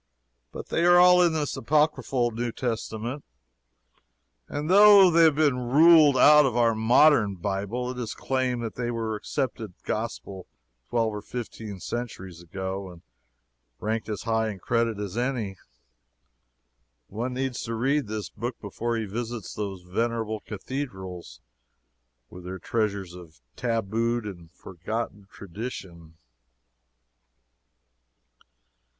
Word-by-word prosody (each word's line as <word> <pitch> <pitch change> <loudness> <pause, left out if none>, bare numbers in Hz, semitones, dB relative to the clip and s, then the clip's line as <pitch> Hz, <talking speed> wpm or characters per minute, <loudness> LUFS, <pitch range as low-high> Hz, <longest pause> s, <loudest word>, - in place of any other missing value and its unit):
But - - -8
they 165 - 0
are 175 0 +7
all 180 0 +7
in 170 -2 +3
this 150 -2 -2
Apocryphal 140 -3 +1
New 120 +1 -3
Testament, 115 +2 -4 1.2
and 145 +1 -4
though 200 0 +8
they 170 0 +4
have 155 -3 +4
been 145 -4 +2
ruled 155 0 +7
out 150 +2 +7
of 125 -4 0
our 115 -1 +4
modern 110 -1 +4
Bible, 100 +7 -3
it 125 - -7
is 115 -3 -4
claimed 130 -2 -1
that 115 - -4
they 120 -1 -3
were 115 -2 -2
accepted 110 -3 -4
gospel 105 -4 -5 0.4
twelve 115 -2 0
or 105 - -5
fifteen 110 -4 -7
centuries 95 -7 -6
ago, 95 +2 -5
and 85 -2 -14 0.8
ranked 110 0 -3
as 105 - -4
high 110 -1 0
in 105 - -6
credit 115 +2 0
as 100 -1 -5
any. 120 -6 -2 1.5
One 120 +5 -4
needs 130 -2 -2
to 115 - -3
read 135 +3 0
this 105 -1 -4
book 120 +3 -5
before 115 +3 -3
he 110 - -2
visits 115 0 -5
those 100 -3 -5
venerable 110 +3 -2
cathedrals, 95 - -7 0.9
with 90 - -11
their 95 +1 -5
treasures 100 -2 -2
of 85 -5 -13 0.2
tabooed 115 0 -1
and 85 -5 -9
forgotten 100 +3 -6
tradition. 90 -5 -8
115 Hz, 125 wpm, -26 LUFS, 100-125 Hz, 1.5 s, though